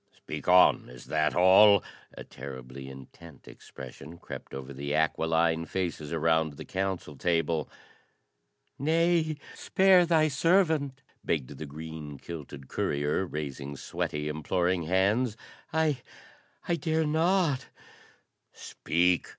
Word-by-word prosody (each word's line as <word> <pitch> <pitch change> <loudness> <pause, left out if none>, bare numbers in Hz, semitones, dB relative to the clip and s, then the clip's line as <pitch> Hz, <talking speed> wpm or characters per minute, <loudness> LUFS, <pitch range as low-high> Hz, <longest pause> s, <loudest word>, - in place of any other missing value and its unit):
"Speak - - -7
on: 90 0 +5
is 60 -1 -12
that 75 -1 0
all?" 95 +3 +7 0.3
A - - -7
terribly 65 0 -9
intent 65 +4 -13
expression 70 +5 -11
crept - - -9
over 65 0 -7
the 70 +2 -3
aquiline 80 +1 +1
faces 85 -4 -3
around 80 -1 +1
the 70 - -9
council 95 -5 -3
table. 80 -1 0 1.1
"Nay, 160 +1 +2 0.2
spare 190 -2 +4
thy 160 -2 +4
servant!" 155 -2 +2 0.2
begged 70 -3 -2
the 75 +2 -7
green 75 0 -8
kilted 75 -3 -9
courier, 75 +9 -1
raising 70 -2 -5
sweaty, 80 -3 -3
imploring 85 +3 0
hands. 105 +6 +2 0.3
"I 155 -5 +1 0.7
I 170 - +1
dare 160 -1 0
not 160 -2 +1 0.5
" - - -44
"Speak!" 90 +2 0
85 Hz, 115 wpm, -28 LUFS, -, 1.1 s, all